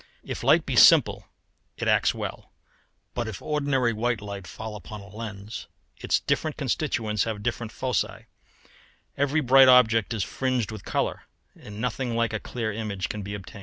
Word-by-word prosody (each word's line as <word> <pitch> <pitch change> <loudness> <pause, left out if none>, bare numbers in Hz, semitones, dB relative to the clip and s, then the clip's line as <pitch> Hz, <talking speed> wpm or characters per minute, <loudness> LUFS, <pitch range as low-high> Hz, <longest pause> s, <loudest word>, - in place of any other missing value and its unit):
If - - -6
light - - +4
be - - -2
simple - - +6 0.5
it - - -3
acts - - +4
well, - - -6 0.6
but 120 -2 -2
if 110 -4 -6
ordinary 140 -5 0
white 115 +1 0
light 100 -2 -7
fall 110 +3 -7
upon 105 +1 -8
a 100 - -12
lens, 105 0 -7 0.3
its - - 0
different 155 -2 -1
constituents 120 -7 -1
have 110 -2 -4
different 115 0 -3
foci; 130 +2 -2 0.9
every 145 +3 +1
bright 135 0 +7
object 115 -4 +5
is 105 - 0
fringed 130 -1 -1
with 110 -3 -8
colour, - - -2 0.3
and 105 0 -10
nothing 125 0 -2
like 115 -1 0
a 110 - -1
clear 115 -1 -4
image 105 -3 -3
can 105 - -4
be 100 +1 -5
obtained. 100 +1 -10
115 Hz, 165 wpm, -26 LUFS, 105-125 Hz, 0.9 s, bright